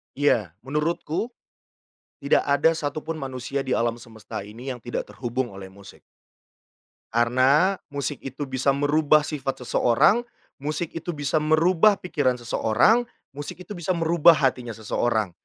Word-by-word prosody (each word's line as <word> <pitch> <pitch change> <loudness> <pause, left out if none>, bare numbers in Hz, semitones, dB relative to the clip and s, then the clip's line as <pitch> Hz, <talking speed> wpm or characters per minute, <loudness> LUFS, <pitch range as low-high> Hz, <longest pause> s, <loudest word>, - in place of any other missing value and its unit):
Iya. 115 - +1
Menurutku, 150 - -2 0.9
tidak 140 - +2
ada 150 +3 +4
satu 145 -2 -4
pun 165 - -3
manusia 135 0 -4
di 130 -2 -1
alam 120 0 0
semesta 110 -2 -8
ini 115 +6 -7
yang 120 - -11
tidak 120 - -4
terhubung 120 -2 -3
oleh 95 -1 -9
musik. 95 0 -15 1.1
Karena, 130 +11 +3
musik 145 -1 -4
itu 135 +2 -6
bisa 135 0 0
merubah 150 +1 +3
sifat 135 -4 -4
seseorang, 125 - +3 0.4
musik 155 +3 -3
itu 165 0 -5
bisa 145 +2 0
merubah 165 +6 +4
pikiran 145 -9 0
seseorang, 120 - +2 0.2
musik 145 +6 -8
itu 210 - -14
bisa 175 -2 -2
merubah 170 0 +5
hatinya 125 -5 -1
seseorang. 110 -2 -1
140 Hz, 135 wpm, -24 LUFS, 120-155 Hz, 1.1 s, merubah